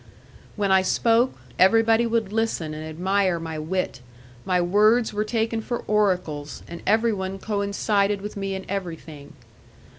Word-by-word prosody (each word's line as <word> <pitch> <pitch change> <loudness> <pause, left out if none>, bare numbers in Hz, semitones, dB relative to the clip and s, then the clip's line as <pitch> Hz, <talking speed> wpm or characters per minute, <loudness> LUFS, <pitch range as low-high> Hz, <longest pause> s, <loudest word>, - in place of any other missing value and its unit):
When 200 -2 0
I 190 0 +6
spoke, 230 +6 +2 0.3
everybody 225 +4 +4
would 225 -3 -1
listen 220 -8 -1
and 155 0 -6
admire 180 +3 0
my 160 -1 -5
wit; 180 -3 -3 0.4
my 180 -1 +2
words 210 +6 +3
were 210 +1 0
taken 225 0 -1
for 240 +2 -4
oracles, 180 -8 -1
and 170 0 -8
everyone 205 -3 +1
coincided 200 0 0
with 205 +1 -7
me 195 -1 -3
in 190 - -6
everything. 165 -6 -6
200 Hz, 140 wpm, -24 LUFS, 180-220 Hz, 0.4 s, I